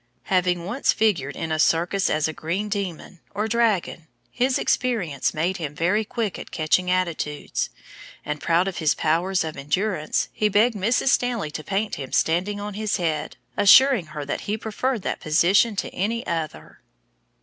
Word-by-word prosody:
Having 180 -2 +1
once 240 +9 +1
figured 170 -11 0
in 160 - -4
a 155 - 0
circus 175 +5 +2
as 155 0 +1
a 160 - -4
green 185 +8 -3
demon, 190 -3 -4 0.2
or 210 +2 0
dragon, 220 -8 0 0.2
his 255 +1 +1
experience 200 - 0
made 175 +5 -1
him 150 -4 -5
very 185 +8 +1
quick 225 -2 -3
at - - -9
catching 175 +3 +1
attitudes; 170 -5 -1 0.6
and, 150 0 -4
proud 170 +3 +2
of 195 - -4
his 155 -3 +2
powers 175 +4 +1
of 160 -1 -5
endurance, 155 +4 -1
he 215 - +1
begged 215 +4 +3
Mrs. 230 +7 +1
Stanley 240 -12 +1
to 155 - -6
paint 200 +4 -2
him 135 -2 -7
standing 185 +6 +1
on 205 0 -5
his 215 0 -1
head, 160 -4 -2 0.2
assuring 215 - +6
her 150 -1 -6
that 145 - -3
he 215 - 0
preferred 225 +1 -2
that - - -2
position 180 +8 +3
to - - -2
any 230 +5 -2
other! 165 -3 -5
185 Hz, 170 wpm, -23 LUFS, 160-215 Hz, 0.6 s, assuring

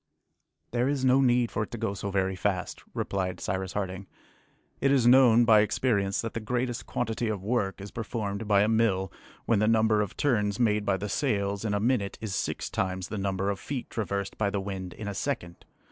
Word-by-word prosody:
"There 120 +1 +1
is 140 -2 0
no 130 +1 +5
need 120 -2 +3
for - - -1
it 105 - -3
to 120 - -6
go 110 -3 -2
so 100 0 -4
very 95 -1 0
fast," 90 -1 -2
replied 95 -2 -2
Cyrus 95 0 -3
Harding. 95 -1 -4 0.7
"It 140 - +2
is 135 -4 +3
known 120 -2 +7
by 110 -2 +7
experience 105 -2 +1
that 115 - -5
the - - -2
greatest 120 +2 -2
quantity 115 -1 -2
of 105 -4 -3
work 105 -3 -1
is 100 0 -8
performed 110 -2 -4
by 100 -1 +4
a - - +2
mill 110 -4 +1 0.3
when 115 -3 +2
the 110 - +2
number 110 -1 +3
of 105 - -4
turns 105 -6 +1
made 105 -3 +2
by 100 -1 +2
the 105 - -4
sails 100 -4 -1
in 105 -2 0
a - - +1
minute 110 -3 0
is 110 -4 -4
six - - -2
times 95 -2 -2
the 105 - -4
number 95 0 0
of 100 - -5
feet 135 -4 -5
traversed 100 -3 -3
by 105 -2 +2
the 100 0 -1
wind 95 -2 -5
in 105 - -7
a 100 - -3
second. 90 -8 -4
105 Hz, 210 wpm, -28 LUFS, 100-115 Hz, 0.7 s, known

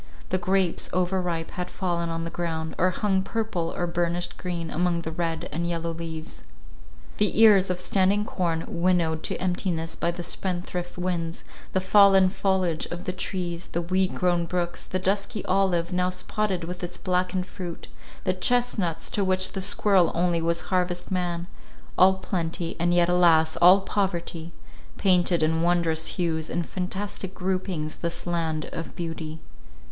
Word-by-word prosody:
The 185 - +1
grapes, 185 -1 +1
overripe, 180 -2 0
had 180 -1 -4
fallen 170 -2 -2
on 165 0 -3
the 165 - -5
ground, 160 -2 -3
or 185 - +4
hung 190 +1 +1
purple, 195 -5 -2
or 175 - -1
burnished 175 0 -1
green, 170 -3 -4
among 175 0 +1
the 160 - -4
red 165 0 -2
and 170 +2 -2
yellow 170 -1 -2
leaves. 160 -1 -7 0.7
The 210 0 +1
ears 205 -4 +7
of 180 -1 -1
standing 195 +3 +2
corn 170 -6 -1
winnowed 170 -2 +1
to - - -1
emptiness 175 -3 -1
by 170 - 0
the 175 0 -4
spendthrift 180 -1 -3
winds; 175 -2 -2 0.3
the 190 - +3
fallen 195 -1 +6
foliage 185 -5 0
of 175 +1 -6
the 190 - -2
trees, 180 -2 -4
the 170 - 0
weed 185 +2 +1
grown 175 -1 +1
brooks, 175 0 -2
the 185 - -1
dusky 200 +2 -1
olive, 185 -2 +1
now 180 0 +2
spotted 185 0 -1
with 180 +2 -6
its 175 0 -5
blackened 180 0 0
fruit; 180 -3 -7 0.4
the 185 - +1
chestnuts, 205 -4 0
to 205 - +1
which 185 0 +2
the 195 - -3
squirrel 195 -2 +3
only 170 -1 +1
was 170 +1 0
harvest 180 0 0
man; 175 -2 -1 0.5
all 190 +1 +6
plenty, 170 -3 -3
and 175 +1 +2
yet, 175 0 +4
alas! 165 -3 +4
all 180 +3 +7
poverty, 175 -4 -2 0.5
painted 180 -3 +3
in 160 +1 +2
wondrous 170 -2 +1
hues 160 -3 -1
and 175 -1 -1
fantastic 190 +1 -4
groupings 185 -4 -2
this 170 0 -3
land 165 -3 -1
of 165 - -6
beauty. 165 -2 -5
175 Hz, 160 wpm, -26 LUFS, 170-185 Hz, 0.7 s, ears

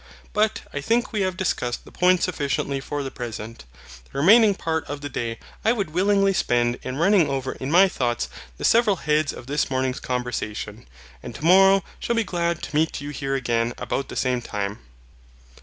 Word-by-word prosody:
But 215 +1 +1
I 145 - -3
think 235 - 0
we 210 - 0
have 185 -1 -1
discussed 125 -10 -2
the - - -14
point 180 0 +3
sufficiently 140 -4 -1
for 145 +1 -4
the 135 - -5
present. 115 - -7 0.5
The - - -8
remaining 205 +7 +6
part 160 -3 -2
of 145 0 -6
the 145 - -5
day 115 -3 -3 0.3
I 225 - +4
would 200 -9 -3
willingly 195 +3 +3
spend 120 -6 +1
in 130 +1 -5
running 175 -1 +4
over 135 -1 -2
in 130 - -6
my 180 +5 +6
thoughts 120 -9 -1 0.3
the - - -3
several 225 -3 +4
heads 150 -3 +1
of - - -10
this 145 +3 -1
morning's 130 0 -1
conversation, 115 - -4 0.3
and - - -8
tomorrow 195 +4 +5 0.2
shall 235 - -1
be 230 - +2
glad 170 -3 -2
to - - -6
meet 160 +1 +1
you 145 0 -6
here 135 -1 -2
again 120 -2 0
about 135 - -3
the - - -7
same 125 -2 0
time. 100 -2 -4
145 Hz, 190 wpm, -23 LUFS, 125-190 Hz, 0.5 s, remaining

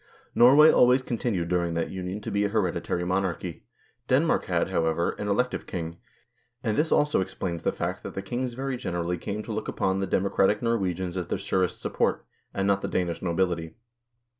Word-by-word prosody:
Norway 140 +6 +8
always 125 +1 +5
continued 110 -9 -2
during 85 -2 0
that 85 - -1
union 95 +2 -5
to - - -5
be 100 0 +1
a 100 - +1
hereditary 90 -4 -1
monarchy; 90 -2 -2 0.4
Denmark - - +2
had, - - 0
however, 80 +1 +1
an 105 - -3
elective 125 +5 0
king; 85 -2 -5 0.6
and 110 -3 0
this 155 +2 +1
also 150 -8 +3
ex 95 +1 -5
plains 85 -3 -3
the - - +1
fact - - -3
that - - -8
the 95 - -4
kings 120 +5 -3
very 135 0 -3
generally 85 -4 -2
came 105 +4 -4
to 110 - -7
look 110 0 -3
upon 95 0 0
the 95 - -1
democratic 100 +2 +2
Norwegians 95 -6 -1
as 90 -2 -3
their - - -1
surest 95 -2 -1
support, - - 0 0.3
and 95 - -1
not 100 0 +2
the - - -2
Danish 85 -2 -1
nobility. 85 -2 -1
95 Hz, 190 wpm, -26 LUFS, 90-110 Hz, 0.6 s, Norway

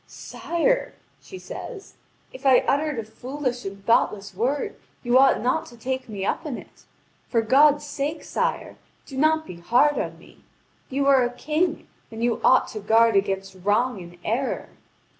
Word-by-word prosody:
"Sire," - - -1 0.3
she 380 - -10
says, 405 +1 -9 0.4
"if 260 - -11
I 265 -2 +6
uttered 295 0 +1
a 230 - -2
foolish 250 +3 -5
and 195 0 -7
thoughtless 205 -3 +1
word, 250 +9 -1 0.3
you 240 0 +1
ought 270 0 +5
not 255 +7 0
to 240 - -14
take 260 +1 -4
me 200 -3 -4
up - - -1
in 290 -6 -4
it. - - -15 0.4
For 230 -2 +2
God's 290 +5 +5
sake, 290 +2 -3
sire, - - -2 0.3
do 270 - -10
not 315 +3 +2
be 180 - -9
hard 245 +12 +3
on - - -4
me! - - -19 0.5
You 275 +1 0
are 275 -2 +5
a 240 - +1
king, 310 +6 -1 0.2
and 225 +1 -6
you 240 -1 0
ought 260 - +5
to 215 - -6
guard 225 +2 +4
against 195 -1 0
wrong 215 +1 +1
and 175 0 -12
error." 255 +5 -2
255 Hz, 170 wpm, -24 LUFS, 220-290 Hz, 0.5 s, I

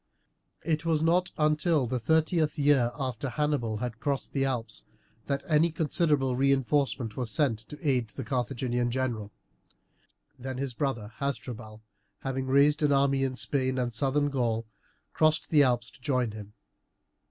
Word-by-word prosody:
It 155 -2 0
was 160 -2 +1
not 180 +3 +3
until 150 -1 +2
the 125 +1 -2
thirteenth 160 - +1
year 140 -4 +4
after 135 0 -3
Hannibal 140 -6 -1
had 120 0 -4
crossed 140 +1 -2
the 135 - +1
Alps 120 -4 -3 0.4
that 140 0 -1
any 160 +1 +3
considerable 150 -4 +1
reinforcement 135 -3 +1
was 125 -3 -3
sent 115 -2 +1
to 150 +2 -7
aid 125 -4 +2
the 130 +5 -7
Carthaginian 125 -1 -1
general. 120 -5 -2 1.1
Then 130 +1 -5
his 135 -1 -3
brother 115 -5 -3
Hasdrubal, 120 -5 -5 0.4
having 135 -1 -3
raised 140 +3 +4
an 150 -1 +3
army 140 -1 +3
in 130 -1 -1
Spain 130 0 0
and 120 -2 -1
Southern 140 +4 +1
Gaul, 115 -4 0 0.5
crossed 155 0 +2
the 150 -2 +6
Alps 120 -4 +1
to - - -20
join 125 -3 0
him. 105 -1 -10
135 Hz, 150 wpm, -28 LUFS, 120-150 Hz, 1.1 s, the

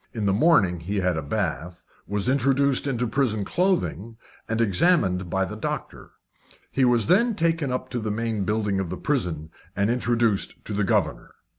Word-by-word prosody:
In 110 -4 -3
the 100 - +2
morning 105 - +3
he 100 +5 -3
had 90 -1 +1
a 80 - -2
bath, 85 +1 -4 0.2
was 100 +2 -2
inducted 140 +1 +2
into 125 -3 -1
prison 110 -4 0
clothing, 170 - -1 0.3
and 115 +1 -1
examined 100 - +2
by 95 +2 0
the - - -7
doctor. - - -5 0.6
He 135 - +1
was 120 -3 +3
then 220 +7 +3
taken 165 -5 0
up 130 0 -3
to 125 - -3
the 110 -1 -3
main 110 -1 -2
building 105 -1 0
of 95 -3 -3
the 90 - -4
prison, 85 - -2 0.3
and 100 +3 +1
introduced 120 -4 0
to 105 - -4
the 105 +1 0
governor. - - 0
110 Hz, 175 wpm, -24 LUFS, 95-135 Hz, 0.6 s, morning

